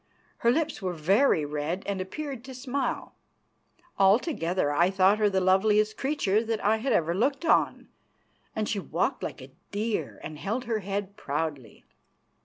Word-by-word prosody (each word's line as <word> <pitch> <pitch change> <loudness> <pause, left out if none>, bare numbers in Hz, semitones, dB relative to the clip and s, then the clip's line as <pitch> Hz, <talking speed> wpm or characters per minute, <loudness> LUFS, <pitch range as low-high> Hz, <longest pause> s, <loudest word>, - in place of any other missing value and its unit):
Her 235 - +2
lips 300 0 0
were 185 -2 -2
very 175 - +3
red 150 +5 -3
and 200 -2 -2
appeared 265 +6 -5
to 260 -1 -9
smile. 265 +2 -3 0.9
Altogether 190 - +2
I 170 +5 +3
thought 195 +2 +3
her 210 -1 +4
the 190 -1 +1
loveliest 210 +3 +3
creature 230 -7 +1
that 225 -1 -2
ever - - -1
I 220 +1 +4
had 175 - +1
looked 275 - 0
on, - - +2 0.7
and 215 -1 -1
she 210 - -1
walked - - -1
like - - -5
a - - -14 0.2
deer 215 +2 -2
and 155 -1 -7
held 225 +8 -2
her 230 -2 -1
head 200 0 -4
proudly. 145 - -4
205 Hz, 160 wpm, -27 LUFS, 185-235 Hz, 0.9 s, her